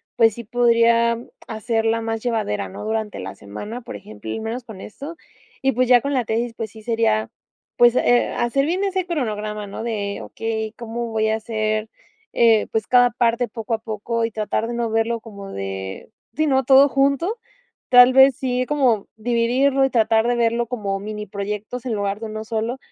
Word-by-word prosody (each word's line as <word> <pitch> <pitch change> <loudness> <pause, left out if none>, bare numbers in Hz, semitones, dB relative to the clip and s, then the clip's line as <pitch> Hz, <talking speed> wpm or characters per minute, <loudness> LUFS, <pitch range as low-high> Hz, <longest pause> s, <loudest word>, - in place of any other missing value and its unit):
pues 225 -2 +4
sí 235 - -7
podría 235 0 +3 0.3
hacerla 225 0 0
más 225 0 -3
llevadera, 215 - -1
¿no?, - - -8
durante 220 -1 -2
la 95 +1 -6
semana, 205 - -8
por 225 - -8
ejemplo, 105 +1 -11
y - - -3
menos 225 +3 -4
con 220 -5 -11
esto. 285 +9 -8 0.5
Y 270 - +2
pues 255 +1 +1
ya 245 -1 +7
con 280 +3 -2
la 255 -3 +1
tesis, 230 +2 -1
pues 220 -3 -5
sí, 220 - -13
sería 215 - +1 0.5
pues, 240 0 +6
eh, 245 0 +3
hacer 275 +4 +1
bien 360 +5 0
ese 380 -2 -1
cronograma, 215 - -3
¿no? 200 - -6
De 205 -3 -3
okey, 220 -1 -4
¿cómo 235 0 -4
voy 220 -1 0
a 220 - +2
hacer, 215 -1 -2 0.4
eh, 225 -2 +4
pues, 220 -1 -1
cada 245 -1 +5
parte 235 +1 +1
poco 230 0 -5
a 225 - 0
poco?, 225 +1 -3
y 225 - -4
tratar 220 +1 -2
de - - -3
no 235 -1 -1
verlo 225 +1 0
como 200 -3 -10
de 95 -1 -6 0.3
sí, 310 - +2
¿no?, 265 -2 +2
todo 270 +2 +7
junto. 280 - +1 0.5
Tal 250 0 +8
vez 265 0 +7
sí, 255 -1 -1
como 255 -8 +1
dividirlo 245 +4 +2
y - - 0
tratar 225 -2 +3
de 245 - +2
verlo 235 0 +1
como 205 -5 -3
miniproyectos 210 +3 -5
en 245 - -1
lugar 200 -1 -2
de 225 - -4
uno 215 0 -5
solo, 225 +3 -2
230 Hz, 190 wpm, -21 LUFS, 215-245 Hz, 0.5 s, Tal